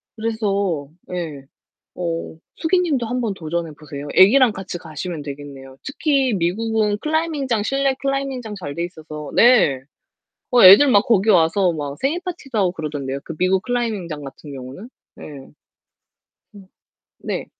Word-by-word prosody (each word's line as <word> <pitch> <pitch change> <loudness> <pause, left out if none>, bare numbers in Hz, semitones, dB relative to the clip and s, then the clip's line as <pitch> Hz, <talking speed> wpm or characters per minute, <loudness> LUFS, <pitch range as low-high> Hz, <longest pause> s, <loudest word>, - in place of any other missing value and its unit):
그래서 200 -8 -1 0.2
예, 165 -6 -4 0.5
어 170 -2 -4 0.2
숙이 350 +3 +1
님도 295 -9 0
한번 240 -3 -2
도전해 170 -2 -4
보세요. 145 -2 -8
애기랑 230 +4 +6
같이 190 -2 -6
가시면 165 0 -6
되겠네요. 140 -2 -9
특히 275 -3 0
미국은 210 +4 0
클라이밍장 305 -7 -1
실내 275 +3 +1
클라이밍장 275 -5 -3
잘 145 -7 -6
돼 170 - -2
있어서 155 -3 -9
네. 220 - +5 0.7
어 245 -1 +5
애들 200 +10 +9
막 205 -3 +4
거기 220 -2 +2
와서 180 0 +4
막 145 -3 -5
생일 295 +6 0
파티도 310 -9 -5
하고 190 -4 +2
그러던데요. 145 -5 -4
그 165 - -7
미국 185 +2 +2
클라이밍장 210 - -3
같은 140 +2 -10
경우는. 135 - -9 0.3
네. - - -12 1.3
음. 195 -2 -14 0.5
네. - - -4
195 Hz, 305 characters per minute, -21 LUFS, 160-245 Hz, 1.3 s, 애들